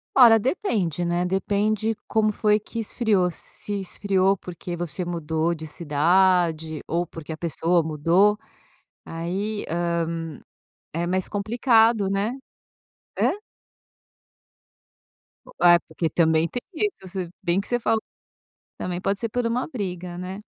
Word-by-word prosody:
Olha, 235 Hz, -4 st, +8 dB
depende, 200 Hz, -, -1 dB
né, 175 Hz, +1 st, 0 dB
depende 210 Hz, +3 st, 0 dB
como 215 Hz, -1 st, +2 dB
foi 210 Hz, 0 st, +2 dB
que 230 Hz, +2 st, -7 dB
esfriou, 215 Hz, -4 st, +1 dB
s 175 Hz, -, -5 dB, 0.3 s
se 205 Hz, -, -3 dB
esfriou 195 Hz, 0 st, +1 dB
porque 175 Hz, -1 st, -7 dB
você 175 Hz, 0 st, -3 dB
mudou 165 Hz, -1 st, -1 dB
de 160 Hz, -1 st, -7 dB
cidade 165 Hz, 0 st, +2 dB
ou 170 Hz, +2 st, 0 dB
porque 165 Hz, -1 st, -9 dB
a 155 Hz, -, -5 dB
pessoa 170 Hz, +1 st, +1 dB
mudou. 170 Hz, +7 st, +3 dB, 0.7 s
Aí, 190 Hz, +6 st, -3 dB
hã, 175 Hz, +1 st, -1 dB, 1.1 s
é 170 Hz, +2 st, -1 dB
mais 185 Hz, +1 st, -1 dB
complicado, 225 Hz, 0 st, +3 dB
né? 200 Hz, +4 st, 0 dB, 0.9 s
Hã? -, -, +3 dB, 2.1 s
Bo -, -, -15 dB
Ah, 175 Hz, -1 st, +7 dB
porque 165 Hz, -, -2 dB
também 160 Hz, -1 st, +3 dB
tem 245 Hz, -, -5 dB
isso, 375 Hz, -, -2 dB
se 180 Hz, -2 st, -4 dB
bem 180 Hz, -1 st, +1 dB
que -, -, -11 dB
você 245 Hz, 0 st, 0 dB
falou 225 Hz, -1 st, +1 dB, 0.8 s
também 180 Hz, 0 st, -4 dB
pode 195 Hz, +1 st, 0 dB
ser 230 Hz, -, -2 dB
por 245 Hz, +2 st, -1 dB
uma 245 Hz, +2 st, -1 dB
briga, 180 Hz, -, -5 dB
né? 185 Hz, +3 st, -6 dB
185 Hz, 135 wpm, -24 LUFS, 170-210 Hz, 2.1 s, Olha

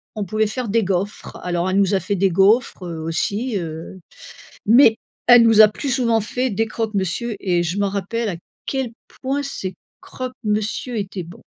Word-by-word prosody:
on 210 Hz, -, -3 dB
pouvait 215 Hz, +3 st, 0 dB
faire 235 Hz, +3 st, -4 dB
des 225 Hz, +2 st, +2 dB
gaufres. 195 Hz, +2 st, -3 dB
Alors 175 Hz, 0 st, -1 dB
elle 190 Hz, -, +1 dB
nous 200 Hz, 0 st, +3 dB
a -, -, +2 dB
fait 200 Hz, -, -2 dB
des 195 Hz, +1 st, +2 dB
gaufres, 195 Hz, +4 st, +3 dB
heu, 165 Hz, -2 st, -5 dB
aussi, 205 Hz, +8 st, -1 dB
heu, 165 Hz, +2 st, -6 dB, 0.7 s
mais 225 Hz, 0 st, +6 dB, 0.3 s
elle 245 Hz, -1 st, +8 dB
nous 225 Hz, -1 st, +5 dB
a 215 Hz, -, +10 dB
plus 270 Hz, +6 st, -4 dB
souvent 235 Hz, -3 st, +2 dB
fait 250 Hz, +4 st, -2 dB
des 225 Hz, +2 st, 0 dB
croque 220 Hz, 0 st, -3 dB
monsieur 200 Hz, +4 st, -1 dB
et 175 Hz, -2 st, +1 dB
je 175 Hz, +4 st, -2 dB
m'en 200 Hz, -1 st, +1 dB
rappelle 205 Hz, +3 st, -2 dB
à 175 Hz, -, -4 dB, 0.3 s
quel 265 Hz, -4 st, -2 dB, 0.3 s
point 275 Hz, +2 st, -1 dB
ces 195 Hz, -9 st, -5 dB, 0.3 s
croque-monsieur 235 Hz, -1 st, -3 dB
étaient 195 Hz, -2 st, -4 dB
bons. 175 Hz, -, -13 dB
210 Hz, 185 wpm, -21 LUFS, 190-235 Hz, 0.7 s, a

